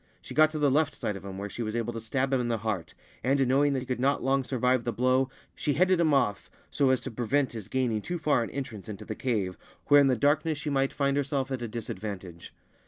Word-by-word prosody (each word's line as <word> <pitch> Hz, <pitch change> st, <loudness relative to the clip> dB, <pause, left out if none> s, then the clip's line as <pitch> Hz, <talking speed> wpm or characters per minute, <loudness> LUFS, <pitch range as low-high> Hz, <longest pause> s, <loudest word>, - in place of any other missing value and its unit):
She -, -, -10 dB
got 155 Hz, 0 st, +6 dB
to 155 Hz, -, -5 dB
the 145 Hz, -2 st, +3 dB
left 150 Hz, +1 st, +2 dB
side 105 Hz, -, -3 dB
of 100 Hz, -, -8 dB
him, 95 Hz, -1 st, -7 dB
where 100 Hz, +1 st, -4 dB
she 110 Hz, -, -6 dB
was 110 Hz, -1 st, -3 dB
able 120 Hz, 0 st, -2 dB
to 115 Hz, -, -5 dB
stab 135 Hz, +4 st, -1 dB
him 130 Hz, -, +3 dB
in 120 Hz, -, -2 dB
the 115 Hz, -1 st, 0 dB
heart, 105 Hz, -6 st, -3 dB, 0.3 s
and, 135 Hz, 0 st, +2 dB
knowing 140 Hz, +2 st, +3 dB
that 130 Hz, -, -1 dB
he -, -, -7 dB
could 125 Hz, -1 st, -3 dB
not 140 Hz, +2 st, +1 dB
long 135 Hz, +1 st, +2 dB
survive 125 Hz, -1 st, +1 dB
the 120 Hz, -, -1 dB
blow, 130 Hz, +3 st, +2 dB, 0.2 s
she 145 Hz, -, -1 dB
headed 185 Hz, +4 st, +3 dB
him 160 Hz, -2 st, +3 dB
off 125 Hz, -8 st, +1 dB, 0.2 s
so 140 Hz, -2 st, +2 dB
as 130 Hz, -1 st, +3 dB
to 135 Hz, -, -6 dB
prevent 125 Hz, +4 st, 0 dB
his 110 Hz, -4 st, -7 dB
gaining 120 Hz, -3 st, 0 dB
too 175 Hz, +11 st, -3 dB
far 155 Hz, -6 st, +2 dB
an 115 Hz, -, -3 dB
entrance 120 Hz, -8 st, -6 dB
into 105 Hz, 0 st, -7 dB
the -, -, -4 dB
cave, 105 Hz, -8 st, -2 dB, 0.3 s
where 145 Hz, 0 st, +8 dB
in 140 Hz, -, +4 dB
the 130 Hz, -, +3 dB
darkness 150 Hz, +5 st, +2 dB
she 150 Hz, 0 st, -3 dB
might 135 Hz, -1 st, +1 dB
find 140 Hz, -1 st, 0 dB
herself 140 Hz, -1 st, -1 dB
at 130 Hz, -2 st, -2 dB
a 120 Hz, -, -3 dB
dis 115 Hz, 0 st, -6 dB
advantage. 95 Hz, -4 st, -7 dB
130 Hz, 265 wpm, -28 LUFS, 110-140 Hz, 0.3 s, where